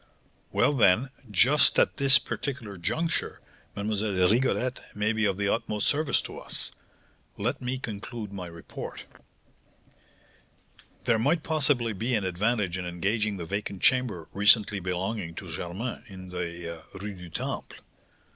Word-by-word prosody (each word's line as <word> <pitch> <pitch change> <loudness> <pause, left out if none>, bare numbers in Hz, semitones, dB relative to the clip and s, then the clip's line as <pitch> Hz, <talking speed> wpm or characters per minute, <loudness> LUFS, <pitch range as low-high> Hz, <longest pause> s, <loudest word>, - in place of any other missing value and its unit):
"Well, - - +3
then, 120 +1 +4 0.2
just 130 +9 +5
at - - +3
this 140 0 +7
particular 120 -8 -4
juncture 165 - -1 0.4
Mlle. 100 -3 +1
Rigolette 125 +2 +2 0.2
may 105 +2 +1
be 110 -1 +1
of 100 -2 +1
the 100 0 0
utmost 105 -2 0
service 150 +1 +2
to - - -7
us. - - -2 0.7
Let - - -1
me 125 +1 -2
conclude 110 -2 -6
my 95 -3 -5
report: 85 -1 -8 2.0
"There 115 -2 +3
might 150 +7 +2
possibly 140 -7 +1
be 115 +5 0
an 105 -3 0
advantage 95 0 0
in 90 - -4
engaging 100 +4 0
the 85 - -5
vacant 100 +1 -4
chamber 120 -11 +2
recently 105 0 +5
belonging 90 0 -2
to 85 -2 -7
Germain, 100 +11 -4
in 95 -3 -10
the 85 -2 -5 0.2
Rue 100 +1 -5
du 90 -2 -10
Temple. 80 - -4
105 Hz, 135 wpm, -28 LUFS, 90-120 Hz, 2.0 s, this